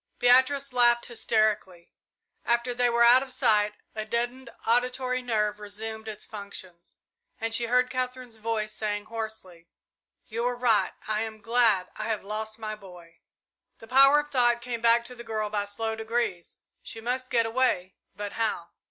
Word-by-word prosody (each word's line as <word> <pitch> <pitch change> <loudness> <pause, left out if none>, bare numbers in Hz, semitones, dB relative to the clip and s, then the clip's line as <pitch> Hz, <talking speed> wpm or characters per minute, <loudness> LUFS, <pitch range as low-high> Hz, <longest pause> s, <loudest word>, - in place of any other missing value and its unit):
Beatrice 260 +2 +4
laughed 240 -1 +4
hysterically. 215 -6 0 0.5
After 235 +1 +1
they 245 0 +2
were 235 0 +3
out 245 +2 +7
of 265 -1 -5
sight, 210 -5 +2 0.2
a 215 - -3
deadened 240 +3 -3 0.2
auditory 250 +2 +1
nerve 210 -4 0
resumed 220 +2 -6
its 210 -1 -6
functions, 190 -5 -10 0.4
and 225 0 -2
she 235 +1 +2
heard 250 +2 +2
Katherine's 255 -2 -4
voice 215 -1 -2
saying, 205 -1 -3
hoarsely, 215 -7 -6 0.6
"You 230 +1 -4
were 245 +1 0
right 240 -3 +2
I 215 0 0
am 220 -1 -5
glad 220 -4 +2
I 215 - -3
have 220 -2 -2
lost 215 +2 -5
my 215 -1 -5
boy!" 180 -5 -13 0.6
The - - -13
power 275 +4 +6
of 295 - -14
thought 240 -3 +3
came 240 -1 -5
back 235 0 +4
to 250 - -3
the 240 -1 -10
girl 215 -2 -3
by 205 -1 -1
slow 220 +2 -3
degrees. 220 -5 -3 0.2
She 225 - -8
must 255 +3 -3
get 230 -1 +2
away 225 -6 0 0.2
but 205 0 -5
how? 215 -7 -2
225 Hz, 165 wpm, -27 LUFS, 210-245 Hz, 0.6 s, out